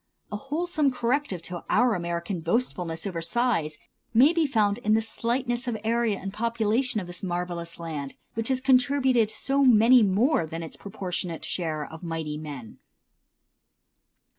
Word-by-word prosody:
A - - -3
wholesome 305 +5 0
corrective 245 - -1
to 175 0 -6
our 245 +1 +4
American 170 0 -3
boastfulness 175 -4 -1
over 175 -4 -3
size 170 -5 0 0.4
may 275 +8 +6
be 330 -3 +2
found 215 -4 +1
in 215 -2 +2
the - - +4
slightness 240 +2 -2
of 235 -2 -1
area 230 -2 +1
and 195 0 -6
population 230 +2 0
of 190 - -5
this 175 0 -7
marvellous 175 -2 -4
land, 150 -5 -5 0.2
which 225 0 -2
has 260 -1 +1
contributed 260 -3 +3
so 275 +6 0
many 245 0 +7
more 205 - +2
than 165 +1 -5
its 160 - -8
proportionate 180 -4 -4
share 155 -4 -2
of 160 +2 -11
mighty 160 -3 -4
men. 140 -8 -8
215 Hz, 150 wpm, -26 LUFS, 170-245 Hz, 0.4 s, many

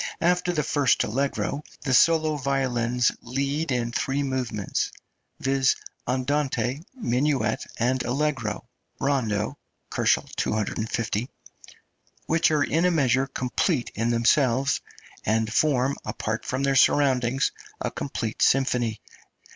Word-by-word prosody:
After 180 +1 +2
the 155 -4 0
first 140 -4 +2
allegro, 140 +4 -1 0.2
the 135 - -1
solo 155 +2 +4
violins 125 -3 +1
lead 140 +5 -2
in 120 -2 0
three 135 +4 -1
movements, 125 -7 -2 0.5
viz.: 135 -1 +2 0.3
andante, 130 +1 0
minuet, 135 - 0
and 125 +2 +1
allegro 125 -6 -2 0.3
(rondo, 125 -8 0 0.3
250 110 +1 0
K.) - - -40 1.0
which 165 +1 +3
are 150 -2 +2
in 165 +5 +1
a - - +5
measure 135 -5 +2
complete 130 +2 -1
in 115 +2 -1
themselves, 125 +3 +2 0.4
and 110 +1 0
form, 135 -2 +2
apart 110 +1 -3
from 130 +2 -1
their 135 0 +2
surroundings, 135 -2 +3 0.3
a - - -2
complete 115 -5 -4
symphony. 125 -5 +2
130 Hz, 110 wpm, -25 LUFS, 120-145 Hz, 1.0 s, a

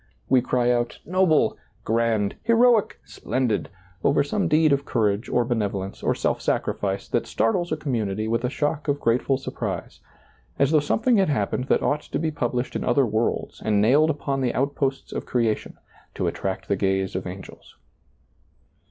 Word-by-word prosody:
We 130 -1 +5
cry 125 0 +1
out, 120 -1 -1
"noble," 180 -2 +2 0.3
"grand," 110 -2 +1
" - - -40
heroic," 230 -1 +4
" - - -35
splendid," 125 -5 -2 0.3
over 140 - +3
some 180 +6 -1
deed 155 -1 +4
of 140 0 0
courage 110 -3 0
or 120 - +2
benevolence 100 -5 -2
or - - +1
self - - -1
sacrifice 100 -1 -1
that - - 0
startles 175 +10 0
a - - 0
community 110 -8 -2
with 115 +2 0
a 125 - 0
shock 150 +2 -2
of 145 0 0
grateful 125 +3 +1
surprise, 135 - -5 0.6
as 140 +1 +2
though 155 - +5
something 225 - +2
had 195 -5 +3
happened 125 -1 -1
that - - +1
ought 145 +1 +1
to - - -4
be 160 0 -1
published 125 -3 -2
in - - -2
other 130 +2 +3
worlds 110 +1 -2
and 105 -2 +2
nailed 140 +9 +4
upon 140 -3 -2
the 125 -2 0
outposts 135 0 -1
of - - -5
creation, 115 -3 -1 0.4
to - - -2
attract 95 0 -3
the 100 - +1
gaze 95 -1 0
of 95 0 -3
angels. 95 +2 -10
125 Hz, 175 wpm, -24 LUFS, 110-145 Hz, 0.6 s, We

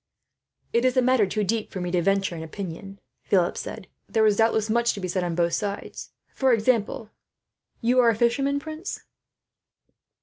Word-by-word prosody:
"It 235 - +2
is 255 0 +2
a - - +6
matter 250 -5 +3
too 210 +3 -1
deep 215 +2 -2
for 190 - -5
me 180 -1 -3
to 180 -1 +2
venture 195 +1 +1
an 160 - -6
opinion," 195 +3 -7 0.2
Philip 180 -3 +1
said. 215 -4 -7 0.2
"There 220 -1 +3
is 210 -2 +3
doubtless 220 -1 +2
much 235 +1 +2
to - - -7
be 185 - -3
said, 180 0 -1
on 175 -1 -2
both 170 0 +1
sides. 200 +3 -4 0.2
For 265 -2 +2
example 225 -1 0 0.7
you 245 +2 +3
are 240 -2 +6
a 230 - +2
fisherman, 275 +5 +1
prince?" 315 +5 -6
215 Hz, 180 wpm, -25 LUFS, 190-235 Hz, 0.7 s, a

